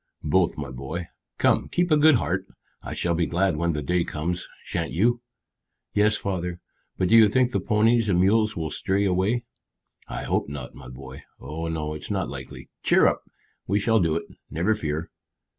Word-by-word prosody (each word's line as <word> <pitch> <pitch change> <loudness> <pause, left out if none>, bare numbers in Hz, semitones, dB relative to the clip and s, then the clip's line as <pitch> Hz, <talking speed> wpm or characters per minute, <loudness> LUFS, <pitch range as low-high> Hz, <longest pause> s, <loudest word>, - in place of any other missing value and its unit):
"Both, 80 +3 +2
my 70 -3 -5
boy. 70 +7 -6 0.3
Come, - - +2
keep 175 -1 0
a - - +7
good 155 0 +6
heart. 95 -4 -1 0.3
I - - -6
shall 85 - 0
be 85 -1 +1
glad 90 +1 +1
when 85 +2 0
the 75 -1 -3
day 90 +3 +1
comes 85 +3 -3 0.2
shan't 85 -1 -3
you?" 120 +7 +2 0.7
"Yes, 105 0 +3
father. 90 -3 -3 0.4
But 90 - +1
do - - +6
you 110 -2 +8
think 125 +2 +2
the - - 0
ponies 115 0 +2
and 90 -2 +3
mules 110 +3 +3
will 80 -2 -3
stray 100 +1 0
away?" 100 +6 +1 0.6
"I - - -5
hope - - -1
not, 70 -3 -7
my 65 -2 -11
boy. 65 +1 -10 0.2
Oh 80 +3 -5
no, 80 -2 -3
it's 75 - -7
not 95 -3 -1
likely. 65 -2 -8
Cheer - - +4
up; - - +2 0.5
we 100 - +2
shall 110 +2 +3
do 80 -4 +1
it, 85 - -1 0.3
never 90 +7 +1
fear." 80 -5 -3
90 Hz, 190 wpm, -25 LUFS, 80-105 Hz, 0.7 s, you